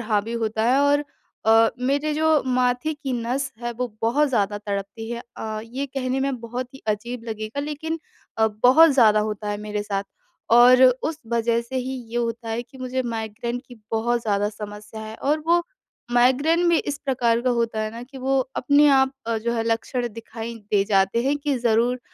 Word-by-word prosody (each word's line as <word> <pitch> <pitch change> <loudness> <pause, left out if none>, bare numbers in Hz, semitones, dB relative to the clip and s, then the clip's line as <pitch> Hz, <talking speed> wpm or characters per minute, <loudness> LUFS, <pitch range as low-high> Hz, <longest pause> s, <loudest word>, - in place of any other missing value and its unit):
हावी 215 0 -1
होता 220 0 -1
है। 265 - +4
और 285 +1 +3 0.4
अ, 225 0 +6
मेरे 285 +4 0
जो 315 -1 +3
माथे 255 +4 0
की 290 -3 -5
नस 255 +3 -2
है 240 - -2
वो 250 +1 -3
बहुत 280 +6 +2
ज़्यादा 205 -4 0
तड़पती 200 +2 -5
है। 235 0 -4
अ, 215 -1 -4
ये 260 +5 -4
कहने 265 0 -2
में 270 -3 -1
बहुत 245 +2 -6
ही 270 - -13
अजीब 230 +3 -3
लगेगा 220 +4 -4
लेकिन 300 +3 -4 0.4
अ, 220 - +5
बहुत 250 +9 +5
ज़्यादा 220 -6 +5
होता 210 0 -3
है 205 - -2
मेरे 210 0 -2
साथ। 200 -1 -2 0.5
और 245 +2 +7 0.2
उस 310 0 -2
वज़ह 235 0 +1
से 235 +3 -6
ही 260 +1 -2 0.2
ये 235 - -4
होता 230 -1 -2
है 225 +2 -2
कि 260 +2 -17
मुझे 255 0 -2
माइग्रेन 235 +1 -4
की 245 - -12 0.2
बहुत 235 +2 +1
ज़्यादा 205 -2 +1
समस्या 210 +1 -9
है। 220 0 -7
और 295 +5 0
वो 345 +1 +4 0.5
माइग्रेन 285 +8 +3
भी 340 - +4
इस 290 0 -3
प्रकार 240 -4 +1
का 255 - +1
होता 230 -2 0
है 215 0 -2
ना 230 +2 -8
कि, 265 +2 -11
वो 270 +1 +1 0.2
अपने 285 +3 +4
आप 265 -1 +4 0.3
जो 235 - +1
है 225 -1 0
लक्षण 235 +2 -1
दिखाई 230 +1 -7 0.2
दे 205 -2 +4
जाते 195 +2 +2
हैं 285 +2 +2
कि 290 -1 -1
ज़रूर 240 +2 +1
240 Hz, 190 wpm, -23 LUFS, 220-265 Hz, 0.5 s, और